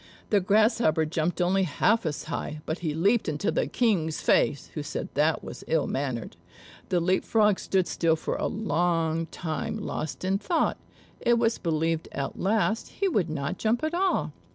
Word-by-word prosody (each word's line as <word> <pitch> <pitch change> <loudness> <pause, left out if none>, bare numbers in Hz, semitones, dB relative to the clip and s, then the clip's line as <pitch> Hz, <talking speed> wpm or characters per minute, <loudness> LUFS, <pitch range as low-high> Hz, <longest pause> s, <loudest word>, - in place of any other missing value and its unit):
The 205 - +5
Grasshopper 205 -4 +3
jumped 160 +3 -1
only 185 +2 +3
half 190 +5 +2
as 150 - -3
high; 155 -1 -4
but 160 - -3
he 155 -4 -2
leaped 200 +5 +2
into 150 +6 -1
the - - 0
King's 180 -10 +1
face, 145 - +2
who 150 - -3
said 145 +1 -4
that 155 +3 +2
was - - -8
ill 160 -3 +2
mannered. 130 -5 -3 0.5
The 180 - +2
Leap 185 +2 +1
frog 210 -3 +3
stood 190 -2 +1
still 165 -2 +1
for 160 - -3
a - - -1
long 165 -5 0
time 175 +9 -4
lost 185 -5 -4
in 195 +1 +1
thought; 335 - 0 0.4
it 240 0 +3
was 230 -1 +1
believed 165 -1 0
at 140 -1 -4
last 215 +2 0
he 395 - 0
would 200 - +1
not 155 +3 -3
jump 230 +5 +1
at 310 +1 -1
all. 370 +2 +1
175 Hz, 175 wpm, -27 LUFS, 155-215 Hz, 0.5 s, The